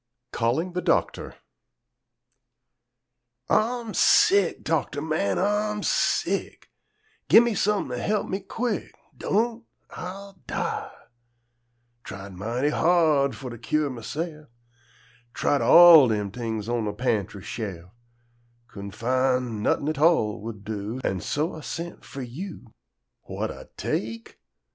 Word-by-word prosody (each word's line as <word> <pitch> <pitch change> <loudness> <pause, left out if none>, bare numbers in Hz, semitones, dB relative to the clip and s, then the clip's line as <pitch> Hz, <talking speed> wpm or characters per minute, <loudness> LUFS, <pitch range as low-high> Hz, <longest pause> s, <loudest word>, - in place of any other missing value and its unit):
CALLING 135 +10 0
THE 180 - -2
DOCTOR - - 0 2.2
Ah'm 230 -1 +1
sick, 195 -3 +4
doctor 150 -2 -1
man, 155 -10 -1
Ah'm 210 +1 0
sick! - - -1 0.6
Gi' - - +9
me 235 -1 +2
some'n' 210 +1 0
to - - -4
he'p 210 0 0
me 190 - -3
quick, 225 +3 -4 0.2
Don't, 230 +3 -1 0.3
Ah'll 195 +1 -8
die! - - -3 1.1
Tried 95 0 -9
mighty 115 +9 -1
hard 155 -5 +3
fo' 125 +4 -7
to 120 -1 -9
cure 145 +4 0
mahse'f; 150 +6 -6 0.9
Tried 145 - +1
all 170 -5 +9
dem 105 -3 -1
t'ings 110 -2 -4
on 120 -2 -1
de 105 - -2
pantry 105 -4 -2
she'f; 95 -7 -6 0.8
Couldn' 100 -2 -8
fin' 125 +1 0
not'in' 140 - +1
a 155 - +1
tall 150 - +2
would 110 -2 -7
do, 105 +3 -5
An' 95 - -1
so 155 +4 -1
Ah 160 - -8
sent 165 +8 -6
fo' 135 - -8
you. 130 - -8 0.6
"Wha'd - - -3
Ah - - -10
take?" 115 +1 -4
140 Hz, 120 wpm, -25 LUFS, 115-180 Hz, 2.2 s, Gi